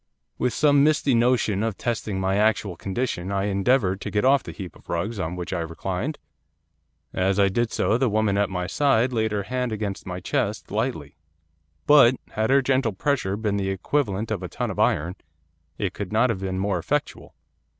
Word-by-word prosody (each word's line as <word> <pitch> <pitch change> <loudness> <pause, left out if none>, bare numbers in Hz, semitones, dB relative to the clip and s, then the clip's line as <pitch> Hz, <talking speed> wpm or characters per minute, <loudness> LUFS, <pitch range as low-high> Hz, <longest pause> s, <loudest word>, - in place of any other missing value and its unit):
'With 125 - +1
some 145 +3 +4
misty 145 -2 +3
notion 115 -4 +2
of 110 -3 -2
testing 110 -4 -2
my 95 +1 0
actual 105 -3 +1
condition 95 0 -3
I 100 -1 0
endeavoured 100 0 +1
to - - -4
get 105 +2 0
off 140 +1 +5
the - - -8
heap 95 -4 -8
of - - -20
rugs 100 +6 -2
on 90 -1 -3
which 90 +1 -5
I 90 - -1
reclined. 90 - -3 1.0
As 95 +2 +1
I 100 -1 +5
did 120 +3 0
so 115 - +1
the 130 -2 +2
woman 105 -1 +1
at 100 -1 +1
my 90 -1 -3
side 125 +3 +2
laid 110 -2 0
her 105 -1 -1
hand 125 +2 -2
against 105 -3 -4
my 90 -1 -4
chest, 100 +3 -2
lightly. 105 - -3 0.7
But, 135 -4 +7 0.2
had 110 +1 -1
her 135 0 +4
gentle 130 -4 +1
pressure 100 -3 -1
been 105 -2 -1
the 95 -1 -1
equivalent 105 +1 -1
of 100 -4 -2
a 90 - -4
ton - - -3
of - - -7
iron, 85 +6 +1 0.6
it 95 -3 -2
could 100 -2 -6
not 115 +3 +3
have 100 - -3
been 95 -1 -3
more 95 -1 0
effectual. - - -3
105 Hz, 195 wpm, -24 LUFS, 95-120 Hz, 1.0 s, But